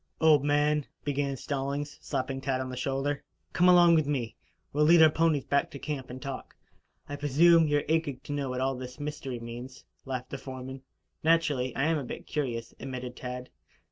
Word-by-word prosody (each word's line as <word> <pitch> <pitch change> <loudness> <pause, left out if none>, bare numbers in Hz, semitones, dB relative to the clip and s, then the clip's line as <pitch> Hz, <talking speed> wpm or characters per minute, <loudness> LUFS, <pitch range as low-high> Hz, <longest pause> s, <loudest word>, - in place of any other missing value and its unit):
"Old 155 -3 +5
man," 145 0 +2 0.2
began 140 -1 -1
Stallings, 140 +2 -3
slapping 135 -1 -3
Tad 135 -1 0
on 130 0 -4
the - - -5
shoulder, 135 +2 -1 0.3
"come 180 +1 +5
along 175 -1 +7
with 155 -3 +3
me. 125 -6 -2 0.4
We'll 150 +1 +3
lead 170 +2 +7
our 155 - +7
ponies 160 -4 +2
back 140 - +1
to - - -8
camp 140 -2 -5
and 125 +1 -7
talk. 135 -1 -7 0.5
I 145 - -5
presume 160 +4 +5
you 145 0 +3
are 145 - 0
aching 155 -4 0
to 145 - -5
know 140 -2 -2
what 125 0 -2
all 135 +1 +1
this 125 +1 -8
mystery 145 -4 -4
means?" 120 +3 -8 0.2
laughed 130 -1 -5
the 135 - -4
foreman. 130 0 -7 0.4
"Naturally, 150 -6 +2
I 135 - 0
am 160 +1 +2
a - - -4
bit 120 - -7
curious," 120 -6 -3
admitted 125 -1 -6
Tad. 125 0 -6
140 Hz, 195 wpm, -29 LUFS, 130-150 Hz, 0.5 s, along